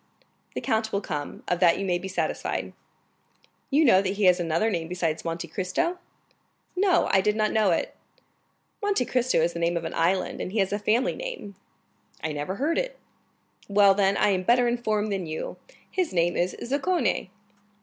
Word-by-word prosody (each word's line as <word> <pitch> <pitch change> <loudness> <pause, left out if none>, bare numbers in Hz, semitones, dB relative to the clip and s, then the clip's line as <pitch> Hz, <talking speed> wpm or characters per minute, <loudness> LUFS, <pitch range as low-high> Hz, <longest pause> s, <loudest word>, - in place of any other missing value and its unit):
"The - - -2
count 220 0 0
will 200 - 0
come, 150 -7 -5
of 180 - 0
that 170 -2 +5
you 195 - -2
may 175 -2 +1
be 190 - -6
satisfied." 190 - -2 1.0
"You 300 +3 +4
know 190 -7 +6
that 195 0 -1
he 205 +1 -2
has 180 -1 +5
another 170 +6 +1
name 165 -4 -2
besides 170 -3 -2
Monte 165 +1 -4
Cristo?" 195 - -2 0.8
"No, 370 -1 +3
I 190 - +5
did 210 +2 +1
not 215 -1 +1
know 215 -3 +3
it." 165 - -1 0.9
"Monte 410 -11 +1
Cristo 250 +1 +1
is 170 +1 +1
the 170 - -5
name 170 +1 +1
of 165 - -4
an - - -4
island, 180 +3 0
and 185 - -5
he - - -2
has 195 -1 +1
a 205 - -1
family 230 +5 +1
name." - - -6 0.7
"I 160 - -1
never 150 +6 -3
heard 300 - 0
it." - - -4 0.7
"Well, 200 -1 +5
then, 195 0 +2
I 210 - +3
am 190 -2 +1
better 240 +5 +3
informed 215 -3 0
than 190 -4 -2
you; 155 0 -5 0.3
his 370 -3 0
name 175 0 +2
is 175 +1 0
Zaccone." 290 - 0
200 Hz, 190 wpm, -26 LUFS, 175-240 Hz, 1.0 s, know